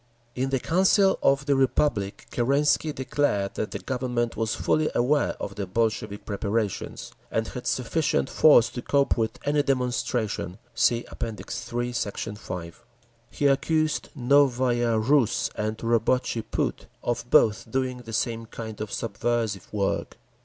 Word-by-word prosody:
In 130 Hz, +1 st, -1 dB
the 135 Hz, -1 st, +1 dB
Council 190 Hz, -, +3 dB
of 135 Hz, 0 st, +3 dB
the 140 Hz, -1 st, +3 dB
Republic 130 Hz, -6 st, +1 dB
Kerensky 145 Hz, +5 st, +2 dB
declared 130 Hz, -7 st, 0 dB
that 110 Hz, -, -3 dB
the -, -, -4 dB
Government 125 Hz, -2 st, -2 dB
was 115 Hz, -2 st, -1 dB
fully 155 Hz, 0 st, +1 dB
aware 145 Hz, +5 st, +2 dB
of 100 Hz, -, -5 dB
the 100 Hz, -1 st, -4 dB
Bolshevik 110 Hz, 0 st, -1 dB
preparations, 105 Hz, 0 st, -3 dB, 0.2 s
and 110 Hz, 0 st, -1 dB
had 125 Hz, -, -6 dB
sufficient 155 Hz, +5 st, 0 dB
force 145 Hz, -6 st, +6 dB
to 125 Hz, -, -6 dB
cope 140 Hz, +2 st, +2 dB
with 115 Hz, +1 st, -1 dB
any 145 Hz, 0 st, +3 dB
demonstration. 125 Hz, -8 st, -1 dB, 0.2 s
(See 120 Hz, +1 st, +2 dB
App. -, -, -12 dB
III, 120 Hz, +3 st, -4 dB
Sect. 105 Hz, -4 st, -3 dB, 0.2 s
5) 90 Hz, -5 st, -7 dB, 0.5 s
He 145 Hz, -, -3 dB
accused 155 Hz, +3 st, +1 dB
Novaya 125 Hz, -3 st, +3 dB
Rus 115 Hz, -1 st, +2 dB
and 110 Hz, +1 st, -2 dB
Robotchi 115 Hz, 0 st, 0 dB
Put -, -, -2 dB, 0.2 s
of 120 Hz, 0 st, -2 dB
both 110 Hz, -1 st, +4 dB
doing 130 Hz, +1 st, -1 dB
the 115 Hz, -2 st, -10 dB
same 115 Hz, 0 st, -1 dB
kind 110 Hz, -1 st, -7 dB
of 110 Hz, -, -4 dB
subversive 110 Hz, -3 st, -2 dB
work. 100 Hz, -2 st, -2 dB
120 Hz, 140 wpm, -26 LUFS, 110-135 Hz, 0.5 s, force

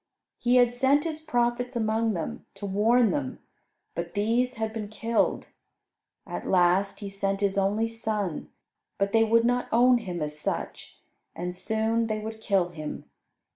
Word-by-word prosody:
He 245 Hz, +1 st, +2 dB
had 245 Hz, -1 st, +5 dB
sent 270 Hz, +4 st, +3 dB
His 315 Hz, -2 st, -4 dB
prophets 245 Hz, -3 st, 0 dB
among 220 Hz, 0 st, +1 dB
them, 165 Hz, -4 st, -5 dB
to 200 Hz, +1 st, -7 dB
warn 220 Hz, +4 st, +3 dB
them, 275 Hz, -3 st, -2 dB, 0.6 s
but -, -, -5 dB
these 235 Hz, +5 st, +1 dB
had 220 Hz, 0 st, -3 dB
been 215 Hz, -2 st, -4 dB
killed. 225 Hz, +2 st, 0 dB, 0.8 s
At -, -, -6 dB
last 185 Hz, +3 st, +3 dB
He 200 Hz, -, -4 dB
sent 195 Hz, 0 st, -2 dB
His 200 Hz, -1 st, +1 dB
only 200 Hz, +3 st, +1 dB
Son, 215 Hz, -6 st, -3 dB, 0.5 s
but 200 Hz, 0 st, 0 dB
they 225 Hz, +1 st, +5 dB
would 230 Hz, +1 st, +3 dB
not 245 Hz, +1 st, +1 dB
own 245 Hz, +2 st, +5 dB
Him 180 Hz, -7 st, -4 dB
as 150 Hz, 0 st, -5 dB
such, -, -, -4 dB, 0.4 s
and 180 Hz, +1 st, -4 dB
soon 220 Hz, +4 st, 0 dB
they 215 Hz, -1 st, -1 dB
would 220 Hz, +1 st, -6 dB
kill 195 Hz, -5 st, +1 dB
Him. 155 Hz, -3 st, -7 dB
220 Hz, 160 wpm, -27 LUFS, 195-240 Hz, 0.8 s, had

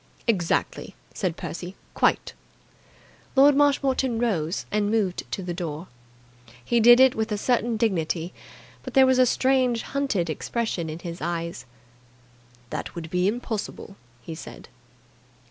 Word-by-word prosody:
"Exactly!" 185 Hz, -8 st, -1 dB, 0.2 s
said 180 Hz, -4 st, -2 dB
Percy. 175 Hz, +2 st, -6 dB, 0.2 s
"Quite!" -, -, +1 dB, 1.0 s
Lord 280 Hz, +1 st, +6 dB
Marshmoreton 275 Hz, -4 st, +2 dB
rose 190 Hz, -8 st, -1 dB
and 210 Hz, -1 st, +1 dB
moved 205 Hz, -5 st, -1 dB
to 190 Hz, -, -3 dB
the 175 Hz, -1 st, -4 dB
door. 170 Hz, -1 st, -5 dB, 0.8 s
He 235 Hz, -, +2 dB
did 240 Hz, +2 st, +8 dB
it 260 Hz, -1 st, +6 dB
with 220 Hz, 0 st, -2 dB
a 210 Hz, -, 0 dB
certain 235 Hz, +1 st, 0 dB
dignity, 175 Hz, -5 st, -1 dB, 0.5 s
but -, -, -9 dB
there 265 Hz, -1 st, +7 dB
was 260 Hz, 0 st, +3 dB
a 255 Hz, -, +6 dB
strange 255 Hz, -2 st, +2 dB
hunted 270 Hz, -11 st, -1 dB
expression 170 Hz, +1 st, -3 dB
in 155 Hz, -, -5 dB
his 170 Hz, 0 st, -7 dB
eyes. 170 Hz, -6 st, -4 dB, 1.0 s
"That -, -, -5 dB
would 165 Hz, -2 st, -7 dB
be 180 Hz, +1 st, +1 dB
impossible," 215 Hz, -3 st, -4 dB, 0.3 s
he 165 Hz, -, -7 dB
said. 160 Hz, -, -10 dB
205 Hz, 135 wpm, -25 LUFS, 170-245 Hz, 1.0 s, did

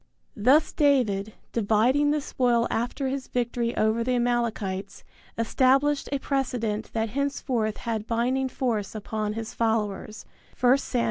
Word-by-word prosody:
Thus 260 Hz, +9 st, +4 dB
David, 220 Hz, -9 st, +2 dB, 0.2 s
dividing 235 Hz, +7 st, +2 dB
the 300 Hz, 0 st, +1 dB
spoil 240 Hz, -3 st, +1 dB
after 245 Hz, +4 st, -1 dB
his 265 Hz, 0 st, -3 dB
victory 240 Hz, -1 st, -1 dB
over 220 Hz, +2 st, +2 dB
the 250 Hz, +1 st, 0 dB
Amalekites, 230 Hz, -5 st, -1 dB, 0.3 s
established 270 Hz, +5 st, +2 dB
a 280 Hz, -, +1 dB
precedent 245 Hz, -6 st, -2 dB
that 225 Hz, 0 st, -1 dB
henceforth 255 Hz, -4 st, -1 dB
had 225 Hz, -2 st, -3 dB
binding 255 Hz, +3 st, 0 dB
force 225 Hz, -6 st, -2 dB
upon 215 Hz, 0 st, -3 dB
his 225 Hz, +1 st, -5 dB
followers 220 Hz, -2 st, -1 dB, 0.4 s
(I 250 Hz, +1 st, +7 dB
Sam. 255 Hz, -2 st, -2 dB
235 Hz, 130 wpm, -26 LUFS, 220-265 Hz, 0.4 s, I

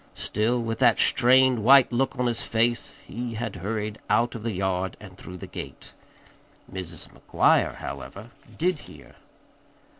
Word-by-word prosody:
Still 115 Hz, +4 st, 0 dB
with 115 Hz, -1 st, -3 dB
that -, -, +4 dB
strained, 130 Hz, -2 st, +4 dB
white 130 Hz, +2 st, +6 dB
look 135 Hz, +2 st, -1 dB
on 125 Hz, -, 0 dB
his 120 Hz, -1 st, -1 dB
face 115 Hz, +1 st, 0 dB
he 120 Hz, -1 st, -6 dB
had 110 Hz, -3 st, -4 dB
hurried 105 Hz, +3 st, -4 dB
out 120 Hz, +1 st, +2 dB
of 115 Hz, -, -7 dB
the 115 Hz, +1 st, -2 dB
yard 95 Hz, -1 st, -2 dB
and 95 Hz, -3 st, -12 dB
through 90 Hz, -1 st, -10 dB
the -, -, -8 dB
gate. -, -, -9 dB, 0.8 s
Mrs. 90 Hz, -3 st, -5 dB
McGuire, -, -, +2 dB
however, 110 Hz, +4 st, -8 dB, 0.3 s
did 175 Hz, -1 st, 0 dB
hear. -, -, -15 dB
115 Hz, 150 wpm, -25 LUFS, 100-120 Hz, 0.8 s, white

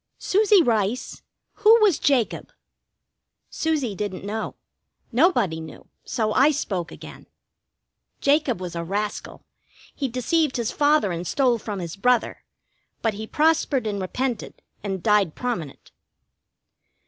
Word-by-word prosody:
"Susie 410 Hz, -2 st, +4 dB
Rice, 225 Hz, -1 st, -1 dB, 0.4 s
who 440 Hz, +2 st, +7 dB
was 415 Hz, -7 st, +4 dB
Jacob?" 260 Hz, -6 st, 0 dB, 1.0 s
Susie 300 Hz, -9 st, -1 dB
didn't 195 Hz, -1 st, -5 dB
know. 215 Hz, +2 st, -4 dB, 0.6 s
Nobody 240 Hz, -, +2 dB
knew, 160 Hz, -1 st, -11 dB
so 215 Hz, -3 st, -1 dB
I 275 Hz, +3 st, +5 dB
spoke 195 Hz, -, -2 dB
again. -, -, -11 dB, 0.9 s
"Jacob 280 Hz, -, +2 dB
was 180 Hz, -2 st, -6 dB
a 170 Hz, -, -3 dB
rascal. 205 Hz, +4 st, -4 dB, 0.5 s
He 275 Hz, -, -2 dB
deceived 260 Hz, +4 st, 0 dB
his 235 Hz, -2 st, -1 dB
father 290 Hz, -8 st, +2 dB
and 170 Hz, +1 st, -4 dB
stole 250 Hz, -4 st, +2 dB
from 210 Hz, -1 st, -5 dB
his 170 Hz, -2 st, -5 dB
brother. 240 Hz, +3 st, +1 dB, 0.6 s
But 225 Hz, -2 st, +1 dB
he 215 Hz, +2 st, -7 dB
prospered 300 Hz, -4 st, +1 dB
and 205 Hz, -2 st, -2 dB
repented, 240 Hz, +5 st, -4 dB, 0.2 s
and 190 Hz, -4 st, -4 dB
died 210 Hz, -6 st, +3 dB
prominent." 205 Hz, -, -5 dB
230 Hz, 125 wpm, -24 LUFS, 200-285 Hz, 1.0 s, who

